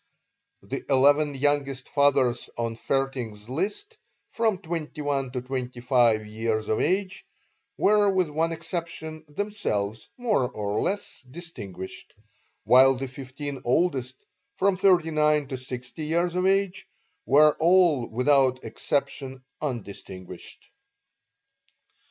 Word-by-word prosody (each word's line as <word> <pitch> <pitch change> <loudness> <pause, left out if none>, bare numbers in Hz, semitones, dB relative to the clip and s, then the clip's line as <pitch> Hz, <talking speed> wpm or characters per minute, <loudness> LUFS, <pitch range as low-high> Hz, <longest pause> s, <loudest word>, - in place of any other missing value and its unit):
The - - -5
eleven 145 +2 +4
youngest 140 -2 0
fathers 135 -4 +2
on 115 -1 -2
Vaerting's 120 -5 -2
list, 205 - -3 0.3
from 220 -4 +1
twenty 165 -4 -5
one 140 -2 -1
to 125 - -2
twenty 125 -1 -5
five 120 -4 +3
years 110 0 -2
of 110 - +1
age, 190 +3 0 0.5
were 205 0 +4
with 185 -3 +2
one 165 +2 0
exception 165 -1 -5
themselves 145 - -3
more 215 - +1
or 105 -3 -2
less 200 -5 -3
distinguished; 105 - -9 0.5
while 130 +3 +6
the 135 +2 -4
fifteen 135 +1 -7
oldest, 130 -2 +1 0.4
from 195 0 +2
thirty 180 -4 +3
nine 150 -2 +2
to 130 - -3
sixty 130 +3 -6
years 170 +2 0
of 180 +1 +1
age, 195 -1 +1 0.4
were 150 +1 +6
all 170 -7 +4
without 130 +1 +2
exception 135 -2 -3 0.2
undistinguished. 100 - -7
140 Hz, 115 wpm, -26 LUFS, 125-170 Hz, 0.5 s, while